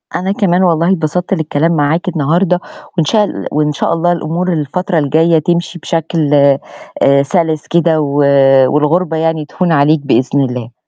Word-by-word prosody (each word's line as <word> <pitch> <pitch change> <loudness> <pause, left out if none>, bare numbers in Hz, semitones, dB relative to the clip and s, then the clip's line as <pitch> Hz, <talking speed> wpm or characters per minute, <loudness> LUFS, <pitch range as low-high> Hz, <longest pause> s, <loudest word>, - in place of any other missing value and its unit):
أنا 190 +2 -2
كمان 190 -2 +1
والله 170 +1 +2
اتبسطت 180 +2 -2
للكلام 160 -1 -1
معاك 155 +4 0
النهاردة، 175 +3 0 0.4
وإن 160 - +2
شاء 215 +5 +2
ال - - -6
وإن 150 0 0
شاء - - -1
الله 175 +1 0
الأمور 175 +2 -2
الفترة 165 +4 -2
الجاية 160 +3 +2
تمشي 175 +1 -2
بشكل 165 -2 -2 0.7
آآ 140 0 +4
سَلِس 160 -1 -1
كده 165 -2 +1
و 145 0 -2 0.5
والغربة 160 +3 0
يعني 160 -1 -1
تهون 175 +3 -2
عليك 150 +1 +3
بإذن 135 +2 +1
الله. 125 -2 -4
160 Hz, 155 wpm, -13 LUFS, 150-175 Hz, 0.7 s, آآ